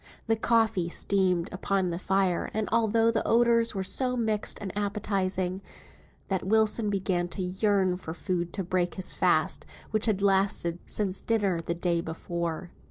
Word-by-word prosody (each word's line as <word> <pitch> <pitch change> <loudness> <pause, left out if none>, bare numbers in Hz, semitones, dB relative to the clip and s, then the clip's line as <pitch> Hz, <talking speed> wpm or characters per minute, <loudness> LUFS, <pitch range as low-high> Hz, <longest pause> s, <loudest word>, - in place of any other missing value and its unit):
The 225 - +2
coffee 220 -6 +2
steamed 180 -2 +1
upon 190 -1 0
the 170 - -3
fire, 190 -2 +1
and 220 -1 0
altogether 225 0 +3
the 225 - -1
odours 230 -1 +3
were 190 - -1
so 250 +5 0
mixed 220 -3 -1
and 195 -2 -6
appetising, 195 -2 -1 0.7
that 190 -2 -1
Wilson 215 +1 +2
began 190 -3 0
to 185 +2 -5
yearn 190 0 +1
for 165 -3 -7
food 175 -2 -2
to 195 - -2
break 180 0 -1
his 185 - -1
fast, - - +1 0.3
which 215 +1 +1
had 200 -2 +1
lasted 190 -3 +2
since 195 -3 -2
dinner 205 -6 +1
the 170 +1 -3
day 170 -1 0
before. 170 +1 -4
195 Hz, 160 wpm, -28 LUFS, 180-215 Hz, 0.7 s, altogether